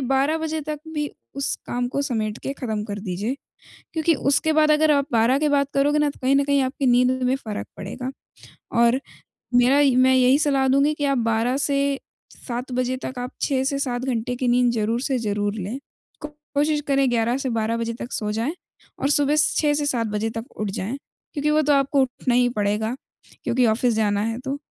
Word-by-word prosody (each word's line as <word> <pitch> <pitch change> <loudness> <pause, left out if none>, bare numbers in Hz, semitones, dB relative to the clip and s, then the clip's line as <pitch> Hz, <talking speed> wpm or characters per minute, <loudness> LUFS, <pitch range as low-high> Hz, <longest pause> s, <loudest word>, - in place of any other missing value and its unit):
12 270 +4 +1
बजे 315 0 -2
तक 300 0 -5 0.2
भी 295 -1 -2 0.3
उस 275 - -1
काम 245 0 -1
को 275 - -2
समेट 220 -5 -2
के 275 - -3
खत्म 220 -6 -4
कर 205 -1 -5
दीजिए, 200 +5 -3 0.6
क्योंकि 325 0 +2 0.2
उसके 315 +3 +2
बाद 305 0 +4
अगर 305 0 +4
आप 280 -2 +2
12 235 +3 +3
के 300 0 +1
बाद 280 -1 +2
करोगे 290 +2 +2
ना, 295 - +2
तो 285 - -11
कहीं 265 +1 +3
न 280 - +4
कहीं 280 -1 +2
आपकी 265 +1 -2
नींद 250 +1 +4
में 250 +1 +2
फ़र्क 220 -6 -6
पड़ेगा। 250 +7 -5 0.7
और 235 +2 +4 0.5
मेरा 245 +3 +5 0.2
मैं 260 0 +5
यही 260 +1 +5
सलाह 275 -3 +2
दूँगी 275 +3 +3
कि 290 - -3
आप 275 -2 +1
12 230 +2 +1
से 280 0 0 0.7
7 245 +1 -4
बजे 255 +1 0
तक 260 - -5
आप 245 0 -4
6 265 -2 +1
से 275 +1 0
7 250 -3 -2
घंटे 245 -1 -2
के 250 0 -1
नींद 245 0 +3
ज़रूर 225 +1 0
से 265 -1 0
ज़रूर 205 -2 -1
लें, 215 +4 -4 0.5
कोशिश 300 0 -2
करें 275 -1 +3
11 235 +1 +1
से 270 - -3
12 225 0 0
बजे 230 0 -2
तक 240 - -6
सो 210 -1 -2
जाएँ, 230 +9 -2 0.5
और 275 - +1
सुबह 290 +1 +3
6 300 -1 +2
से 290 0 -1
7 235 -5 0
बजे 215 +1 -2
तक 225 0 -5
उठ 210 -1 -2
जाएँ, 195 +7 -4 0.4
क्योंकि 295 0 0
वो 310 +1 +3
तो 295 - +2
आपको 275 0 +3
उठना 250 -1 -1
ही 245 0 +4
पड़ेगा 210 +3 0 0.5
क्योंकि 250 0 +2
ऑफिस 230 +2 +2
जाना 205 -2 +1
है 225 +1 -2
तो। 270 +1 -3
255 Hz, 205 wpm, -23 LUFS, 230-280 Hz, 0.7 s, मेरा